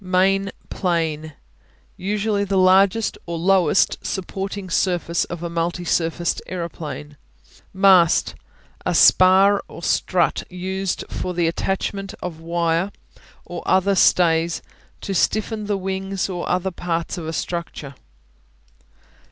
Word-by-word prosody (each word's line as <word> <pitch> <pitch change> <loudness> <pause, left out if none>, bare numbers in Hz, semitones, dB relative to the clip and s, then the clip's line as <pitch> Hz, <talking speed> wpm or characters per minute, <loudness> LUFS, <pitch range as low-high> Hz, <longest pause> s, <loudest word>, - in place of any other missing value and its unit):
Main 190 +2 +2 0.2
Plane 160 -4 -1 0.6
Usually 205 +1 -1
the 200 -1 -1
largest 190 +3 +3
or 170 0 -3
lowest 190 +2 +2
supporting 195 +1 -4
surface 175 -1 0
of 175 -1 -7
a - - -2
multi 170 +1 -2
surfaced 170 +1 0
aeroplane. 160 -4 -6 0.5
Mast 190 -4 +4 0.5
A - - -1
spar 190 +2 +6
or 170 - -11
strut 175 -2 +1
used 190 +1 -3
for 180 -1 -4
the 170 -1 +1
attachment 195 +4 -2
of 170 -3 -6
wire 170 +2 0 0.5
or 175 -1 -6
other 190 +1 +3
stays 170 -3 +3 0.4
to 195 - -4
stiffen 215 +3 0
the 205 -1 0
wings 190 0 -3
or 175 -2 -4
other 185 +1 0
parts 170 0 -3
of 160 - -6
a - - -2
structure. 170 -5 -5
185 Hz, 120 wpm, -21 LUFS, 170-195 Hz, 0.6 s, spar